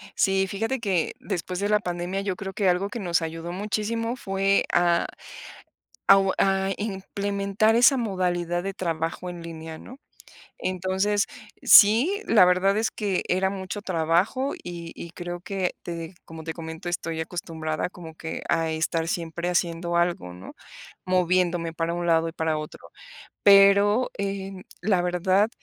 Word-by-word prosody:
Sí, 195 0 +2
fíjate 225 +7 -2
que 190 -7 0
después 180 -1 -4
de 205 +1 -1
la 210 - +4
pandemia, 180 0 -3
yo 195 -2 -2
creo 195 +1 -6
que 195 -2 +2
algo 180 +3 +1
que 235 - -5
nos 170 -4 +1
ayudó 165 +1 -5
muchísimo 215 +5 -2
fue 195 -3 +1
a 175 -1 +3 1.0
a 195 - +9
o 195 -1 +2
a 195 0 +2
implementar 200 +1 0
esa 245 +4 +6
modalidad 180 -6 -1
de 195 0 -3
trabajo 165 -1 -3
en 175 -1 -8
línea, 160 -1 -8
¿no? 255 +10 -12 0.6
Entonces, 190 +3 0 0.4
sí, 245 - +7
la 215 -5 +6
verdad 185 +2 +3
es 225 +1 +1
que 200 -4 -1
era 190 +1 +2
mucho 195 +1 -5
trabajo 185 - 0
y 170 -1 -7
y 170 - -8
creo 175 0 -6
que 185 0 -2
te 170 +1 -6
como 160 -1 -9
te 160 - -3
comento, 160 +1 -7
estoy 165 -2 -3
acostumbrada 160 -2 -4
como 170 -3 -11
que 160 0 -6
a 165 -1 +1
estar 160 +1 -1
siempre 170 +1 -3
haciendo 170 -1 -1
algo, 170 - 0
¿no?, 90 - -11 0.5
moviéndome 180 -2 +1
para 165 +1 -2
un 175 0 -3
lado 165 -1 +3
y 165 - -6
para 160 -2 -1
otro. 150 - -9 0.5
Pero, 200 +4 +6
em, 195 -1 -4 0.2
la 185 -2 +2
verdad 185 +4 +2
185 Hz, 155 wpm, -25 LUFS, 170-200 Hz, 1.0 s, a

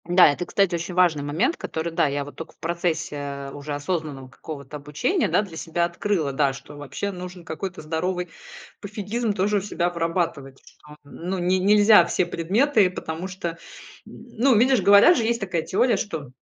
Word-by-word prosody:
Да, 175 +2 +6
это, 175 +5 -4
кстати, 195 -3 +1
очень 170 +1 -3
важный 175 -5 +3
момент, 165 - 0
который, 160 +1 -4
да, 160 - +2
я 140 0 -2
вот 145 - -11
тока 165 - -9
в - - -38
процессе 150 -5 -3
уже 145 0 -5
осознанного 145 -4 -4
какого-то 140 +2 -8
обучения, 150 - -1
да, - - +2
для 185 -6 -10
себя 170 +1 -1
открыла, 170 -4 -1
да. 135 -1 +2
Что 135 +3 -11
вообще 145 +8 -5
нужен 180 -1 -9
какой-то 185 +4 -5
здоровый 175 +3 -2 0.5
пофигизм 210 +2 -3
тоже 205 +2 +1
у - - 0
себя 180 -3 -1
вырабатывать. 165 -5 -2
Что, 150 0 -16
ну, 175 +6 -5
не 180 +1 +1
нельзя 205 0 +6
все 175 +1 0
предметы, 200 - +2
потому 170 0 -5
что 175 -3 -5 0.5
ну, 250 +2 0
видишь, 250 +1 +4
говорят 200 - +7
же 235 - +1
есть 235 +1 0
такая 185 -4 -2
теория, 220 +7 +1
что 160 - -5
175 Hz, 175 wpm, -24 LUFS, 150-200 Hz, 0.5 s, говорят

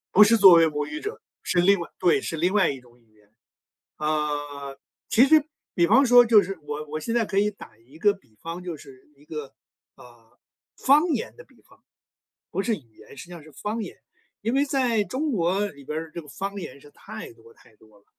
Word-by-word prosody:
不 210 - +9
是 230 +2 +4
作 195 -4 +9
为 165 -1 +6
母 150 -1 -3
语 305 - -6
者， 420 +3 -6 0.2
是 180 - 0
另 195 +3 +4
外 170 - -7
对， 180 -2 +3
是 165 - -5
另 180 +5 0
外 200 -5 +3
一 135 - -8
种 120 -1 -22
语 110 -2 -32
言。 105 -1 -28 0.7
呃， 145 -2 -3 0.3
其 240 +4 +5
实 310 +1 +5 0.3
比 170 -1 +2
方 260 +8 +5
说 245 0 +7
就 215 -3 +6
是 195 +2 -5
我 150 +1 -6
我 155 +1 -4
现 230 +9 -3
在 235 -2 +2
可 200 -1 0
以 210 +1 +2
打 200 - -14
一 120 +7 -19
个 205 +4 +3
比 130 - -23
方， 170 +5 -7
就 175 -3 -6
是 135 -2 -16
一 145 +1 -23
个， 150 -3 -8 0.4
呃， 120 -1 -19 0.4
方 295 +6 +4
言 280 -10 -3
的 485 - -13
比 - - -26
方 - - -24 0.7
不 - - -1
是 225 +2 0
语 120 - -17
言， - - -15
实 - - -9
际 175 - -15
上 170 - -9
是 155 0 -17
方 215 +10 -4
言。 195 - -7 0.5
因 225 +3 -1
为 275 +2 +2
在 255 -6 +1
中 285 +6 -2
国 190 0 0
里 140 -6 -14
边 155 - -4
儿， 160 0 -6
这 170 - -6
个 150 - -17
方 200 +6 -5
言 140 -6 -9
是 145 - -17
太 220 - -10
多 115 0 -19
太 - - -23
多 110 -1 -22
了。 100 - -34
170 Hz, 245 characters per minute, -24 LUFS, 145-215 Hz, 0.7 s, 不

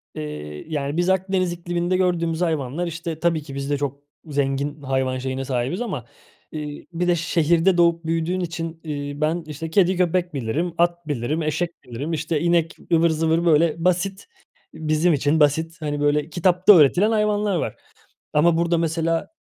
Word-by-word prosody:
Eee, 75 0 -6
yani, 145 -1 -3
biz 175 +1 +2
Akdeniz 190 -1 +1
ikliminde 175 +1 -1
gördüğümüz 170 -3 0
hayvanlar, 160 0 -1
işte, 165 -1 -5
tabii 170 -2 +1
ki 140 -2 -9
biz 140 0 -4
de 145 - +1
çok 140 0 -3 0.3
zengin 140 0 -2
hayvan 130 -1 -1
şeyine 130 +1 -3
sahibiz 130 - -2
ama, 230 -6 -4 0.5
eee, 150 -1 -6
bir 175 +1 -1
de 175 - +4
şehirde 170 +2 +2
doğup 170 -1 +3
büyüdüğün 165 +3 -1
için, 165 -1 -4
iii, 145 -1 -5
ben, 160 +3 0
işte, 160 +2 -6
kedi, 185 +1 +3
köpek 180 -1 +1
bilirim, 145 +7 -2
at 175 -1 +1
bilirim, 145 +3 -1
eşek 170 +3 -2
bilirim, 135 +7 -5
işte, 160 0 -1
inek 170 -1 +1 0.2
ıvır 165 0 +4
zıvır, 160 +2 +1
böyle, 165 -1 +4
basit 190 +2 0 0.5
bizim 160 +2 +1
için 145 +2 +1
basit, 160 +3 +1
hani, 145 -1 -2
böyle 145 +1 +1
kitapta 180 +4 +5
öğretilen 175 +7 +5
hayvanlar 210 -2 +1
var. 170 - -2 0.6
Ama 165 +2 +4
burada 170 0 +2
mesela 165 0 0
165 Hz, 165 wpm, -22 LUFS, 145-175 Hz, 0.6 s, kitapta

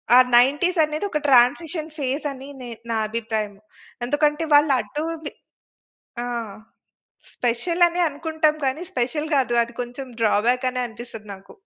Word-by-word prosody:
ఆ - - +9 0.2
నైన్టీసనేది 305 +6 +3
ఒక 300 - -1
ట్రాన్సిషన్ 300 +5 +3
ఫేజని 275 0 -3
నే 245 - -7 0.2
నా 225 - +1
అభిప్రాయం. 220 -2 -3 0.5
ఎందుకంటే 295 +4 +1
వాళ్ళటు 290 0 +3 0.2
వి - - -4 0.9
ఆ! - - -3 1.1
స్పెషలని 340 +9 +1
అనుకుంటాం 310 +1 0
కానీ, 265 +5 -1
స్పెషల్ 280 +5 -1
గాదు, 260 -3 +2
అది 235 0 -14
కొంచెం 245 +2 -5
డ్రాబ్యాకనే 250 +4 +2
అనిపిస్తది 225 -1 -10
నాకు. 195 0 -15
270 Hz, 115 wpm, -23 LUFS, 240-305 Hz, 1.1 s, ఆ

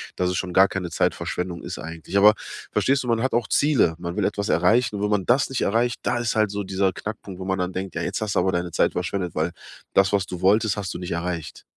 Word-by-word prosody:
dass 90 0 0
es - - -2
schon 95 - -3
gar 95 +2 +6
keine 95 -3 -4
Zeitverschwendung 90 +1 -2
ist - - -5
eigentlich. 80 +4 -4
Aber 105 +2 +8 0.4
verstehst 135 0 +2
du, - - -6
man 115 -1 +2
hat 130 - 0
auch 120 -1 +1
Ziele, 145 - +3
man 85 0 -5
will - - +1
etwas 100 0 -1
erreichen 110 +7 +3
und 100 - -3
wenn 105 - 0
man 100 -3 +1
das 130 +2 +3
nicht 135 - -2
erreicht, 115 +3 +1
da - - 0
ist 120 -2 -1
halt 110 -1 +3
so 100 0 -3
dieser 95 0 0
Knackpunkt, 100 -2 -7
wo 95 - -5
man 95 0 -1
dann 90 0 -1
denkt: 95 -1 -4
„Ja, - - -2
jetzt - - -2
hast 105 -2 -1
du - - +4
aber 95 +1 +2
deine 85 0 -1
Zeit - - +2
verschwendet.“ 90 0 -3
Weil 80 +3 0 0.4
das, 95 -1 +4
was 100 -2 +2
du 90 -2 -7
wolltest, 105 +2 +3
hast 100 -3 -3
du - - -5
nicht 90 - -6
erreicht. 85 -1 -4
95 Hz, 265 wpm, -24 LUFS, 90-110 Hz, 0.4 s, Aber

